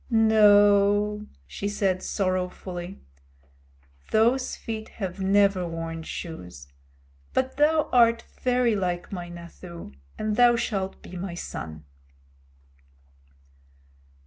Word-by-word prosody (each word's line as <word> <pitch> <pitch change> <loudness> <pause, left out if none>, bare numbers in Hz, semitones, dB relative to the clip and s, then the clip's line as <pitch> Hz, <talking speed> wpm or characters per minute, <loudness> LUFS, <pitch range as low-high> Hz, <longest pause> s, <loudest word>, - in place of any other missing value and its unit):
"No," 210 -2 +4 0.2
she 200 - -5
said 195 -2 0
sorrowfully, 185 -1 -3 1.1
"those 240 +4 +2
feet 220 -2 -6
have 190 -2 -6
never 195 -1 +3
worn 165 0 -5
shoes, 90 - -8 0.7
but 260 0 0
thou 305 +1 +3
art 235 -1 +5 0.2
very 250 -3 +2
like 180 -3 -2
my 175 -3 -5
Nathoo, 170 - -10 0.3
and 215 0 -2
thou 240 -1 +6
shalt 195 -5 -2
be - - -10
my 175 -1 -5
son." 80 - -7
200 Hz, 95 wpm, -26 LUFS, 175-220 Hz, 1.1 s, thou